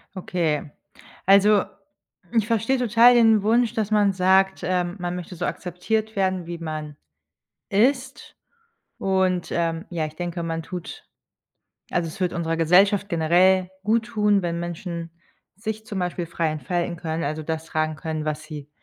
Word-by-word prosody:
Okay. 165 Hz, -5 st, -2 dB, 0.5 s
Also, 200 Hz, +1 st, +5 dB, 0.7 s
ich 220 Hz, -2 st, +3 dB
verstehe 230 Hz, +3 st, +1 dB
total 235 Hz, 0 st, +6 dB
den 225 Hz, -3 st, +5 dB
Wunsch, 230 Hz, +2 st, +2 dB
dass 220 Hz, -2 st, -2 dB
man 205 Hz, -2 st, +3 dB
sagt, 190 Hz, +1 st, +3 dB
ähm, 180 Hz, -1 st, -1 dB
man 175 Hz, 0 st, -3 dB
möchte 180 Hz, 0 st, -7 dB
so 175 Hz, +1 st, -3 dB
akzeptiert 215 Hz, +5 st, -2 dB
werden, 190 Hz, -2 st, 0 dB
wie 170 Hz, 0 st, -5 dB
man 155 Hz, -2 st, -5 dB, 0.7 s
ist 255 Hz, +6 st, 0 dB, 0.6 s
und, 190 Hz, -2 st, 0 dB
ähm, 165 Hz, 0 st, -1 dB
ja, 165 Hz, -3 st, -1 dB
ich 155 Hz, 0 st, -11 dB
denke, 175 Hz, 0 st, -4 dB
man 165 Hz, 0 st, -3 dB
tut 180 Hz, +1 st, -8 dB, 0.9 s
also, 175 Hz, -1 st, 0 dB
es 160 Hz, -, -10 dB
würde 180 Hz, -1 st, 0 dB
unserer 165 Hz, -1 st, -1 dB
Gesellschaft 190 Hz, +5 st, +4 dB
generell 180 Hz, +2 st, +3 dB, 0.2 s
gut 225 Hz, +2 st, +2 dB
tun, 210 Hz, -4 st, +2 dB
wenn 170 Hz, -1 st, -2 dB
Menschen 170 Hz, -1 st, -5 dB, 0.5 s
sich 220 Hz, +2 st, -5 dB
zum 200 Hz, -, -4 dB
Beispiel 180 Hz, -1 st, -2 dB
frei 165 Hz, -1 st, -1 dB
entfalten 170 Hz, +3 st, -2 dB
können, 165 Hz, -1 st, -3 dB
also 155 Hz, +2 st, -3 dB
das 160 Hz, +1 st, -4 dB
tragen 155 Hz, -1 st, -1 dB
können, 155 Hz, -1 st, -4 dB
was 155 Hz, 0 st, -3 dB
sie 150 Hz, -2 st, -9 dB
180 Hz, 155 wpm, -24 LUFS, 165-205 Hz, 0.9 s, total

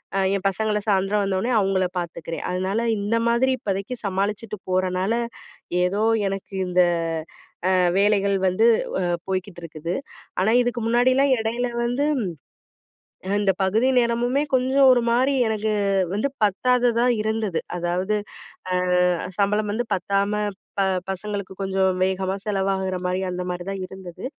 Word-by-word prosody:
அ -, -, +2 dB, 0.2 s
என் 195 Hz, -, -9 dB
பசங்கள 210 Hz, +2 st, -1 dB
சாயந்தரம் 200 Hz, +1 st, +2 dB
வந்தோனே 195 Hz, +5 st, 0 dB
அவுங்கள 190 Hz, -2 st, +1 dB
பார்த்துக்கிறேன். 165 Hz, -1 st, -5 dB
அதனால, 185 Hz, +4 st, -1 dB, 0.2 s
இந்த 205 Hz, +3 st, 0 dB
மாதிரி 255 Hz, +3 st, +3 dB
இப்பதைக்கி 200 Hz, +5 st, -3 dB
சமாளிச்சுட்டு 205 Hz, +2 st, -2 dB
போறனால, 185 Hz, +2 st, +1 dB, 0.7 s
ஏதோ 200 Hz, +4 st, 0 dB, 0.3 s
எனக்கு 195 Hz, 0 st, -6 dB
இந்த 180 Hz, 0 st, +4 dB, 0.9 s
அ -, -, +3 dB, 0.3 s
வேலைகள் 200 Hz, 0 st, +3 dB
வந்து 185 Hz, +5 st, +3 dB, 0.3 s
வ -, -, 0 dB, 0.3 s
போய்க்கிட்டு 185 Hz, -1 st, -3 dB
இருக்குது. 165 Hz, 0 st, -6 dB, 0.5 s
ஆனா 195 Hz, +4 st, +3 dB
இதுக்கு 245 Hz, 0 st, -1 dB
முன்னாடில்லாம் 255 Hz, +4 st, +3 dB
இடையில 230 Hz, +3 st, -1 dB, 0.2 s
வந்து, 245 Hz, +4 st, 0 dB
ம் -, -, -1 dB, 1.1 s
அ -, -, -2 dB
இந்த 200 Hz, -2 st, +3 dB
பகுதி 220 Hz, +7 st, +2 dB
நேரமுமே 240 Hz, +3 st, +1 dB
கொஞ்சம் 260 Hz, +2 st, +4 dB
ஒரு 245 Hz, -, +4 dB
மாரி 255 Hz, +4 st, +3 dB
எனக்கு, 215 Hz, 0 st, -1 dB, 0.4 s
வந்து 215 Hz, +7 st, 0 dB, 0.2 s
பத்தாததா 240 Hz, +3 st, +2 dB, 0.2 s
இருந்தது. 215 Hz, -4 st, -1 dB, 0.2 s
அதாவது, 180 Hz, +4 st, -1 dB, 0.5 s
அ -, -, 0 dB, 0.7 s
சம்பளம் 210 Hz, +1 st, +1 dB
வந்து 235 Hz, +3 st, -1 dB
பத்தாம 200 Hz, +3 st, 0 dB, 0.5 s
ப -, -, +4 dB, 0.3 s
பசங்களுக்கு 200 Hz, 0 st, -4 dB
கொஞ்சம் 190 Hz, -1 st, +1 dB
வேகமா 190 Hz, 0 st, -1 dB
செலவாகுற 190 Hz, -2 st, 0 dB
மாரி, 185 Hz, +1 st, -1 dB
அந்த 180 Hz, 0 st, -3 dB
மாரி 180 Hz, 0 st, -4 dB
தான் 195 Hz, -1 st, -4 dB
இருந்தது. 185 Hz, -2 st, -10 dB
200 Hz, 135 wpm, -23 LUFS, 190-230 Hz, 1.1 s, இந்த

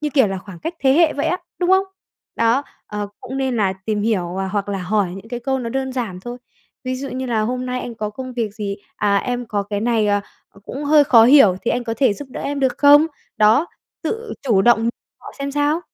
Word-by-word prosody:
như 300 Hz, -1 st, -2 dB
kiểu 265 Hz, -5 st, +5 dB
là 195 Hz, -1 st, -3 dB
khoảng 190 Hz, -2 st, -11 dB
cách 330 Hz, -, -5 dB
thế 265 Hz, -1 st, +4 dB
hệ 320 Hz, +2 st, +4 dB
vậy 285 Hz, -, -2 dB
á, 355 Hz, -, +1 dB, 0.2 s
đúng 355 Hz, 0 st, +1 dB
không? 380 Hz, 0 st, +5 dB, 0.5 s
Đó, 230 Hz, +4 st, +2 dB, 0.2 s
ờ, 210 Hz, -1 st, -4 dB
cũng 265 Hz, -, -6 dB
nên 265 Hz, -3 st, -1 dB
là 195 Hz, -3 st, +2 dB
tìm 210 Hz, -2 st, 0 dB
hiểu, 185 Hz, -5 st, -1 dB
à, 190 Hz, -, -2 dB
hoặc 205 Hz, +1 st, -2 dB
là 200 Hz, -1 st, -2 dB
hỏi 190 Hz, 0 st, 0 dB
những 195 Hz, +3 st, -11 dB
cái 245 Hz, 0 st, -5 dB
câu 265 Hz, +2 st, -1 dB
nó 240 Hz, -2 st, -4 dB
đơn 265 Hz, +1 st, -2 dB
giản 225 Hz, -8 st, -4 dB
thôi, 240 Hz, +5 st, -7 dB, 0.5 s
ví 255 Hz, 0 st, -2 dB
dụ 275 Hz, +2 st, -5 dB
như 260 Hz, 0 st, -4 dB
là 230 Hz, -3 st, 0 dB
"Hôm 250 Hz, +3 st, -2 dB
nay 250 Hz, 0 st, -2 dB
anh 240 Hz, -, -6 dB
có 210 Hz, -1 st, -4 dB
công 255 Hz, +4 st, -7 dB
việc 225 Hz, -4 st, -3 dB
gì? 205 Hz, -3 st, -4 dB, 0.2 s
À, 200 Hz, -1 st, +2 dB
em 245 Hz, +2 st, -3 dB
có 205 Hz, -2 st, -1 dB
cái 205 Hz, 0 st, -4 dB
này, 225 Hz, -1 st, +1 dB
ờ, 205 Hz, 0 st, +2 dB, 0.4 s
cũng 275 Hz, +5 st, -6 dB
hơi 295 Hz, 0 st, +5 dB
khó 230 Hz, -4 st, +7 dB
hiểu 235 Hz, -8 st, +7 dB
thì -, -, 0 dB
anh 245 Hz, 0 st, -1 dB
có 225 Hz, -, -2 dB
thể 250 Hz, -3 st, +3 dB
giúp 285 Hz, +5 st, -9 dB
đỡ -, -, -6 dB
em 285 Hz, 0 st, -3 dB
được 260 Hz, -2 st, 0 dB
không?" 290 Hz, +2 st, +7 dB, 0.3 s
Đó, 220 Hz, +9 st, +4 dB, 0.4 s
tự 455 Hz, 0 st, -4 dB
chủ 215 Hz, -8 st, +3 dB
động 230 Hz, 0 st, +4 dB, 0.3 s
họ -, -, -10 dB
xem 280 Hz, 0 st, -3 dB
sao. 295 Hz, +3 st, +1 dB
240 Hz, 250 wpm, -20 LUFS, 210-270 Hz, 0.5 s, khó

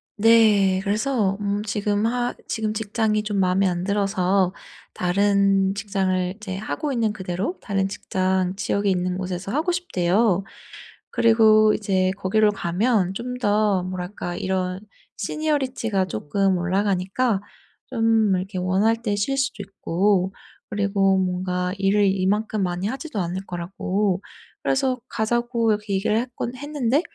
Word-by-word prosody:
네. 210 Hz, -4 st, +5 dB
그래서 210 Hz, -1 st, 0 dB
음 205 Hz, 0 st, -1 dB
지금 205 Hz, 0 st, 0 dB
하 245 Hz, 0 st, -1 dB
지금 215 Hz, -1 st, -2 dB
직장이 215 Hz, 0 st, 0 dB
좀 210 Hz, -1 st, -2 dB
마음에 190 Hz, +1 st, +3 dB
안 175 Hz, 0 st, -1 dB
들어서 195 Hz, -2 st, +1 dB, 0.4 s
다른 195 Hz, +1 st, +2 dB
직장을 190 Hz, -3 st, -1 dB
이제 190 Hz, -3 st, -6 dB
하고 290 Hz, +8 st, -3 dB
있는 225 Hz, -4 st, 0 dB
그대로 190 Hz, -, -3 dB
다른 195 Hz, -2 st, 0 dB
직장 185 Hz, -1 st, -1 dB
지역에 200 Hz, 0 st, 0 dB
있는 180 Hz, 0 st, 0 dB
곳에서 185 Hz, +1 st, -4 dB
하고 315 Hz, +6 st, 0 dB
싶대요. 195 Hz, -, +1 dB, 0.7 s
그리고 220 Hz, -2 st, +5 dB
이제 190 Hz, -3 st, +1 dB
거기로 210 Hz, +2 st, +2 dB
가면 195 Hz, +1 st, 0 dB
좀 250 Hz, +2 st, -4 dB
더 205 Hz, -3 st, +2 dB
뭐랄까 180 Hz, -1 st, -5 dB
이런 185 Hz, 0 st, -2 dB, 0.4 s
Seniority가 255 Hz, -7 st, -1 dB
쪼끔 185 Hz, -, 0 dB
올라가니까 195 Hz, +4 st, 0 dB, 0.5 s
좀 225 Hz, -4 st, +2 dB
이렇게 185 Hz, +1 st, -4 dB
원할 205 Hz, +5 st, +1 dB
때 210 Hz, -3 st, -1 dB
쉴 270 Hz, +7 st, -1 dB
수도 265 Hz, -6 st, -1 dB
있고 195 Hz, 0 st, 0 dB, 0.4 s
그리고 200 Hz, -1 st, +2 dB
뭔가 180 Hz, 0 st, -1 dB
일을 200 Hz, +1 st, +3 dB
이만큼 200 Hz, +2 st, 0 dB
많이 180 Hz, +2 st, -2 dB
하지도 265 Hz, -2 st, -4 dB
않을 185 Hz, +2 st, -3 dB
거라고 185 Hz, +2 st, -2 dB, 0.4 s
그래서 265 Hz, -2 st, +1 dB
가자고 235 Hz, 0 st, 0 dB
이렇게 210 Hz, -1 st, -2 dB
얘기를 210 Hz, +3 st, +1 dB
했곤 245 Hz, 0 st, -3 dB
했는데 290 Hz, 0 st, 0 dB
200 Hz, 300 characters per minute, -23 LUFS, 185-220 Hz, 0.7 s, 네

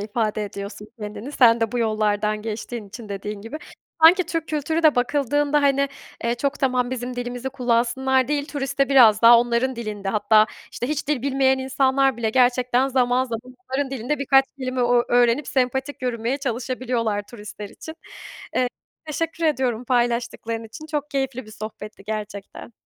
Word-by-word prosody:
ifade 215 Hz, 0 st, -1 dB
ediyorsun 200 Hz, +1 st, -8 dB
kendini. 210 Hz, +6 st, -7 dB
Sen 235 Hz, -4 st, +5 dB
de 225 Hz, -1 st, 0 dB
bu 245 Hz, -, -1 dB
yollardan 215 Hz, -1 st, 0 dB
geçtiğin 220 Hz, 0 st, -5 dB
için 220 Hz, +2 st, -10 dB
dediğin 200 Hz, +1 st, -5 dB
gibi. 230 Hz, +7 st, -6 dB, 0.5 s
Sanki 355 Hz, +3 st, +7 dB
Türk 330 Hz, -1 st, -3 dB
kültürü 315 Hz, +2 st, -1 dB
de 310 Hz, -2 st, +5 dB
bakıldığında 290 Hz, +3 st, +1 dB
hani, 280 Hz, 0 st, +3 dB, 0.4 s
eee, 235 Hz, -, +1 dB
çok 280 Hz, +4 st, -2 dB
tamam, 250 Hz, -2 st, +1 dB
bizim 250 Hz, -1 st, -4 dB
dilimizi 245 Hz, +1 st, -4 dB
kullansınlar 255 Hz, +1 st, +1 dB
değil. 290 Hz, 0 st, -1 dB
Turistte 275 Hz, -1 st, -1 dB
biraz 235 Hz, -6 st, +6 dB
daha 235 Hz, +1 st, +9 dB
onların 240 Hz, +2 st, 0 dB
dilinde 210 Hz, -4 st, -5 dB
hatta 215 Hz, +1 st, +4 dB, 0.3 s
işte 245 Hz, -, -4 dB
hiç 300 Hz, -1 st, -3 dB
dil 290 Hz, -5 st, 0 dB
bilmeyen 265 Hz, -1 st, +2 dB
insanlar 265 Hz, 0 st, +2 dB
bile 225 Hz, -2 st, -1 dB
gerçekten 250 Hz, +1 st, +3 dB
zaman 255 Hz, -1 st, +2 dB
zaman 230 Hz, -3 st, -4 dB, 0.3 s
onların 265 Hz, +1 st, -1 dB
dilinde 270 Hz, +3 st, -2 dB
birkaç 270 Hz, -1 st, +4 dB
kelime 255 Hz, -1 st, -2 dB
o 245 Hz, 0 st, +2 dB
ö 240 Hz, -, +2 dB
öğrenip 245 Hz, +3 st, +3 dB
sempatik 265 Hz, +2 st, -1 dB
yürümeye 245 Hz, +1 st, -1 dB
çalışabiliyorlar, 245 Hz, -4 st, -2 dB
turistler 210 Hz, -2 st, -9 dB
için. 320 Hz, +9 st, -10 dB, 0.6 s
Eee, 250 Hz, -, +2 dB, 0.4 s
teşekkür 330 Hz, +2 st, -3 dB
ediyorum 255 Hz, -6 st, 0 dB
paylaştıkların 235 Hz, -2 st, -1 dB
için. 305 Hz, +8 st, -10 dB
Çok 300 Hz, -1 st, -3 dB
keyifli 270 Hz, -4 st, -2 dB
bir -, -, -12 dB
sohbetti 215 Hz, -1 st, -9 dB
gerçekten. 210 Hz, +1 st, -6 dB
245 Hz, 160 wpm, -23 LUFS, 225-270 Hz, 0.6 s, daha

